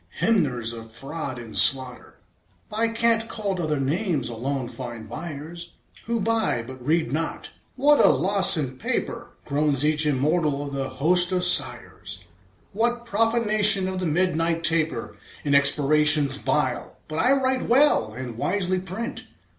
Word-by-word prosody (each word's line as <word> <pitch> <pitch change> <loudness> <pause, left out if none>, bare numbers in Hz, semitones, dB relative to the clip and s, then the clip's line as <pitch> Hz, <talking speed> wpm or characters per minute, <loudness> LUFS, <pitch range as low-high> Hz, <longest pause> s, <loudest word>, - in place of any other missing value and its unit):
Hymners 130 - 0
of 115 -1 -10
fraud 135 +2 -6
and 115 -3 -10
slaughter, 130 -2 +3 0.5
By 220 +2 0
cant 230 0 0
called 200 -5 -4
other 155 -4 -2
names, 160 - -2
alone 130 +3 -4
find 120 -3 -9
buyers 165 +6 -8 0.3
Who 235 0 -2
buy, 220 - 0
but 130 0 -12
read 155 -2 -1
not. 165 +2 -4 0.2
"What 290 +3 +3
a - - +6
loss 190 +6 +5
in 130 -4 -4
paper," - - -4 0.2
Groans 145 -1 0
each 155 0 +3
immortal 150 +1 -1
of 140 - -7
the 135 -1 -4
host 175 +7 +2
of 180 -1 0
sighers! 180 - +1 0.5
"What 235 +3 -1
profanation 215 -3 +3
of 185 0 -4
the 180 - -2
midnight 165 0 -1
taper 165 -1 -1 0.3
In 145 - -1
expirations 145 0 +4
vile! 135 -5 -3
But 155 +1 -5
I 250 +3 +3
write 260 -2 -1
well, 245 - +3
And 120 -1 -8
wisely 185 +1 -1
print. 190 +5 -6
160 Hz, 145 wpm, -23 LUFS, 135-200 Hz, 0.5 s, a